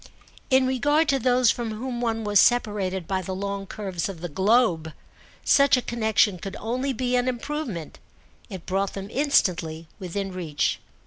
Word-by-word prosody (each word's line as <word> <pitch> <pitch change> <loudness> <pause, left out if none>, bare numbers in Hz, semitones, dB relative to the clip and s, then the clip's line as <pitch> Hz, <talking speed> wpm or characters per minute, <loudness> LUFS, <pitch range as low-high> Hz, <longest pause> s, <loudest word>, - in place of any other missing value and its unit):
In 260 -1 +4
regard 290 +5 +2
to 275 - +2
those 250 -1 +4
from 230 -3 -4
whom 240 +1 -4
one 225 -2 -1
was 205 -2 +3
separated 200 -7 +2
by 190 -1 -1
the 185 +1 -5
long 200 0 -4
curves 190 -3 -4
of 185 -4 -7
the 175 +1 -5
globe 190 -3 +2 0.5
such 280 -1 +5
a - - 0
connexion 220 -4 +1
could 195 +2 -6
only 255 +5 -2
be 250 0 -1
an 250 0 +1
improvement: 250 - -4 0.5
it 190 -5 -8
brought 195 +1 -1
them 195 0 -6
instantly 170 - +1
within 195 +1 -4
reach. 165 -5 -1
210 Hz, 165 wpm, -25 LUFS, 190-250 Hz, 0.5 s, such